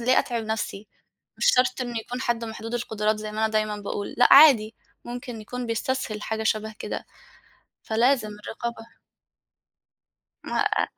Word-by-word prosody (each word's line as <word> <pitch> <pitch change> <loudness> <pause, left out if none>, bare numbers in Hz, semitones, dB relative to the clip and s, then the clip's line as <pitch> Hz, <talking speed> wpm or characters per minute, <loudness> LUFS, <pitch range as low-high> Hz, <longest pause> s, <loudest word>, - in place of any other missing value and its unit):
ليه 255 +2 +4
أتعِب 235 -3 -1
نَفسي، 215 -1 -4 0.5
مش - - 0
شرط 255 0 +2
إن 240 -2 -3
يكون 245 +3 -4
حَد 235 -2 -1
محدود 225 +1 -6
القُدرات 215 -2 0
زي 215 0 -6
ما 215 - -6
أنا 220 0 +2
دايمًا 215 -1 0
باقول، 205 0 -5
لأ 245 - +6
عادي، 245 -7 +7 0.3
ممكن 240 -1 -7
يكون 250 +3 -5
بيستسهل 230 -2 -2
حاجة 220 0 -3
شبَه 220 0 -1
كده، - - -5 0.8
فلازم 230 0 +2 0.2
الرقابة 230 0 -5 1.6
ما - - -3
آآ - - +2
225 Hz, 150 wpm, -25 LUFS, 215-245 Hz, 1.6 s, عادي